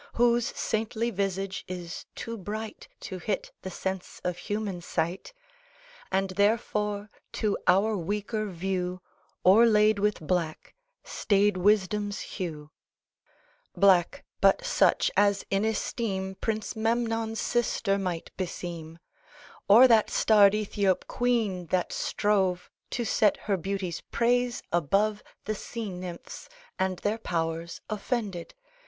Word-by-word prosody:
Whose 240 0 +3
saintly 225 +2 -1
visage 195 -1 -2
is 180 -1 -6
too 230 - -5
bright 215 +2 -6
To 185 - -6
hit 200 +2 -3
the 190 - -5
sense 190 0 -5
of 180 -1 -1
human 205 -2 -3
sight, 175 - -3 0.8
And 190 0 +1
therefore 210 0 0 0.2
to 210 -2 0
our 210 +4 +4
weaker 210 +4 -2
view 180 0 -2 0.5
O'erlaid 210 +1 +6
with 210 +1 +1
black, 165 -1 -2 0.3
staid 205 -1 +2
Wisdom's 205 +1 +1
hue; 155 -5 -6 1.1
Black, 195 +6 +4 0.2
but - - +4
such - - +3
as 200 -1 +3
in 195 +1 +2
esteem 200 -3 -2
Prince 215 +3 -3
Memnon's 225 0 0
sister 220 -4 0
might 180 -4 -4
beseem, 170 -3 -5 0.7
Or 230 +6 +9
that 225 -3 +4
starred 205 -2 +5
Ethiop 200 -3 0
queen 220 -8 0
that 180 +2 0
strove 190 -4 0 0.2
To 240 - -2
set 210 -2 +3
her 205 - +2
beauty's 190 -2 -3
praise 245 +1 +1
above 200 +6 +2 0.2
The 215 - -1
Sea 220 0 -5
Nymphs, 180 -1 -8 0.3
and 190 -1 0
their 215 +5 -1
powers 165 -3 -3
offended. 210 -4 -3
200 Hz, 115 wpm, -28 LUFS, 185-220 Hz, 1.1 s, Or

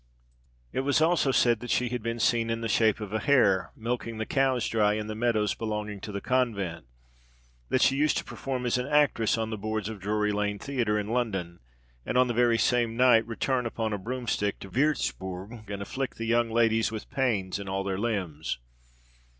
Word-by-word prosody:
It - - -1
was 140 +2 +2
also 160 -3 +3
said 120 -3 +3
that 125 - -8
she 125 -1 +1
had 125 -1 -3
been 115 +1 -3
seen 115 0 +2
in 115 0 -2
the 115 - -1
shape 110 -1 +3
of 105 -1 -6
a 110 - +1
hare, 105 -9 +3
milking 115 0 -3
the 110 - -2
cows 130 -3 +1
dry 105 -2 +2
in 105 0 -2
the 110 - -4
meadows 110 -2 +1
belonging 105 -2 -4
to 105 - -6
the 100 - -3
convent; 100 - -1 0.8
that 130 - +3
she 135 - +4
used 150 0 +2
to - - -1
perform 130 -2 -4
as 125 +1 +1
an 125 - -3
actress 145 -7 +3
on 110 0 -2
the 110 - -4
boards 110 0 -2
of 110 -2 -7
Drury 105 +2 0
Lane 105 0 -1
theatre 120 -5 -1
in 105 0 -3
London, 95 -8 -2 0.4
and, 125 - -1
on 125 - +6
the 120 - -2
very 120 0 +3
same 120 -1 +1
night, 120 -3 +5
return 125 +2 -1
upon 110 -1 -2
a 105 - -2
broomstick 115 -2 -2
to 95 - -9
Würzburg, 110 -6 -2
and 100 -1 -4
afflict 130 +6 -4
the 115 - -4
young 120 0 +2
ladies 115 -1 +2
with 110 -1 -6
pains 105 -8 0
in 100 -1 -6
all 95 0 -1
their 95 -1 -2
limbs. 90 - -2
115 Hz, 205 wpm, -28 LUFS, 105-125 Hz, 0.8 s, on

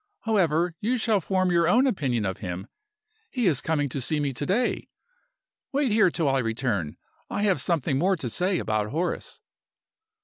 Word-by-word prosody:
However, 175 -6 +1
you 245 +4 0
shall 220 -3 +1
form 185 +1 +1
your 170 -1 +3
own 245 +9 +4
opinion 135 - 0
of 95 -1 -3
him; 90 +1 -5 0.6
he 245 -3 -1
is 150 -7 +3
coming 150 -3 0
to 135 +2 -3
see 150 +5 0
me 140 -2 -1
to 145 +4 -4
day. 235 +6 0 0.8
Wait 275 -3 +1
here 215 -3 +5
till 165 -2 -1
I 135 0 +2
return; 115 - -2 0.3
I 205 - -2
have 190 -9 +2
something 140 -3 0
more 190 +4 +3
to 160 -8 -5
say 180 - 0
about 110 -5 -1
Horace." 165 +7 -3
165 Hz, 175 wpm, -26 LUFS, 130-195 Hz, 0.8 s, here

